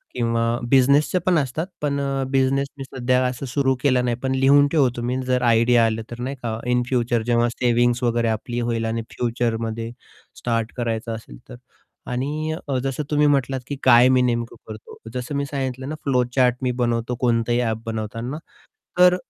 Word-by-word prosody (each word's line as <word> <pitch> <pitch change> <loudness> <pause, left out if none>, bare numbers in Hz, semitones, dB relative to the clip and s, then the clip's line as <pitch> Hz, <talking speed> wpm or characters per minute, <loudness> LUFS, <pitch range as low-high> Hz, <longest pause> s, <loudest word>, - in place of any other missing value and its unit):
किंवा 115 0 0
बिझनेसच 140 +6 +4
पण 180 -3 +3
असतात. 145 +4 -1
पण 140 -1 0
अ, 135 -1 -1
बिझनेस 135 +1 +2
मी 135 - -5
सध्या 130 -1 0
असं 125 +2 -3
सुरू 135 +1 +1
केलं 130 -3 +3
नाही. 120 -1 0
पण 130 0 0
लिहून 140 +2 +5
ठेवतो 130 -6 +2
मी 125 +2 -1
जर 125 0 +1
आयडिया 115 0 +4
आलं 110 0 -1
तर, 120 - -7
नाही 135 +3 -3
का, 110 -1 -3
इन 125 0 +2
फ्युचर 120 -2 +1
जेव्हा 120 0 +2
सेव्हिंग्ज 120 0 +1
वगैरे 120 -1 +1
आपली 120 +2 -3
होईल. 115 -1 -1
आणि 115 +1 -1
फ्युचरमध्ये 115 -1 -2 0.5
स्टार्ट 115 -1 -2
करायचं 115 -1 -2
असेल 105 - -11
तर. - - -8 0.6
आणि 150 +5 -2
अ, 135 -2 0
जसं 135 +2 -2
तुम्ही 150 0 +4
म्हटलात, 135 -2 +1
की 145 - -3
"काय 125 0 +7
मी 130 -1 +4
नेमकं 120 -2 -1
करतो?" 110 -1 -10 0.2
जसं 125 +2 -4
मी 140 0 -1
सांगितलं 130 -1 -4
ना, 155 - -3
फ्लो 125 -3 +2
चार्ट 125 -2 +4
मी 130 -1 0
बनवतो. 120 0 0
कोणतंही 120 -1 +1
ॲप 115 -2 -1
बनवताना, 115 +4 -4 0.6
तर 180 0 +6
125 Hz, 180 wpm, -22 LUFS, 115-135 Hz, 0.6 s, काय